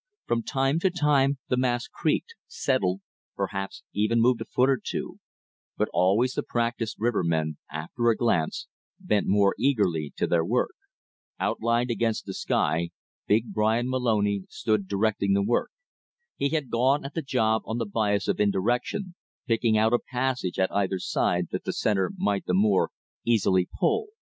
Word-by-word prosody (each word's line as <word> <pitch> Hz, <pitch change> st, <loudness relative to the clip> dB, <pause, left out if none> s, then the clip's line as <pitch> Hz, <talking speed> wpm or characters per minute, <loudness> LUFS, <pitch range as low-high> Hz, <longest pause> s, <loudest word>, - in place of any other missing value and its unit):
From 120 Hz, 0 st, 0 dB
time 135 Hz, +6 st, 0 dB
to 190 Hz, -, +2 dB
time 145 Hz, -5 st, +2 dB
the 125 Hz, -, 0 dB
mass 125 Hz, -1 st, 0 dB
creaked, 460 Hz, -, -1 dB
settled, 100 Hz, -8 st, 0 dB, 0.3 s
perhaps 95 Hz, 0 st, -4 dB
even 110 Hz, +3 st, +2 dB
moved 120 Hz, 0 st, +3 dB
a -, -, -3 dB
foot 125 Hz, -, +2 dB
or 135 Hz, -1 st, +1 dB
two; -, -, -5 dB, 0.6 s
but -, -, 0 dB
always 105 Hz, +8 st, +3 dB
the -, -, -1 dB
practiced 115 Hz, -2 st, -2 dB
rivermen, 85 Hz, -9 st, 0 dB
after 80 Hz, +11 st, -1 dB
a 115 Hz, -, +3 dB
glance, 85 Hz, -10 st, 0 dB, 0.3 s
bent 105 Hz, -1 st, 0 dB
more 100 Hz, 0 st, +4 dB
eagerly 95 Hz, -, +1 dB
to -, -, +1 dB
their 85 Hz, -1 st, +2 dB
work. -, -, 0 dB, 0.7 s
Outlined 120 Hz, +2 st, 0 dB
against 115 Hz, -1 st, -1 dB
the -, -, -5 dB
sky, 85 Hz, +1 st, 0 dB, 0.4 s
big 110 Hz, +3 st, +1 dB
Bryan 110 Hz, +4 st, +1 dB
Moloney 105 Hz, -6 st, +1 dB
stood 110 Hz, -3 st, -1 dB
directing 100 Hz, 0 st, +1 dB
the 100 Hz, 0 st, +2 dB
work. 115 Hz, +4 st, +1 dB, 0.7 s
He 140 Hz, -, 0 dB
had 150 Hz, -4 st, -2 dB
gone 135 Hz, +5 st, +2 dB
at 140 Hz, -, -6 dB
the 165 Hz, -, -2 dB
job 110 Hz, -6 st, +1 dB
on 110 Hz, -, -2 dB
the 115 Hz, -, -1 dB
bias 105 Hz, -1 st, 0 dB
of -, -, 0 dB
indirection, 120 Hz, -, 0 dB, 0.3 s
picking 115 Hz, -1 st, +2 dB
out 110 Hz, +2 st, +3 dB
a 120 Hz, -, +4 dB
passage 125 Hz, -7 st, -2 dB
at 95 Hz, -, +1 dB
either 95 Hz, -1 st, +1 dB
side 90 Hz, -1 st, 0 dB
that -, -, -3 dB
the -, -, -3 dB
center 95 Hz, -4 st, +1 dB
might 100 Hz, -1 st, -1 dB
the 90 Hz, -, +2 dB
more 100 Hz, 0 st, +3 dB, 0.3 s
easily 95 Hz, -6 st, +2 dB
"pull." 435 Hz, 0 st, +1 dB
110 Hz, 160 wpm, -26 LUFS, 100-125 Hz, 0.7 s, more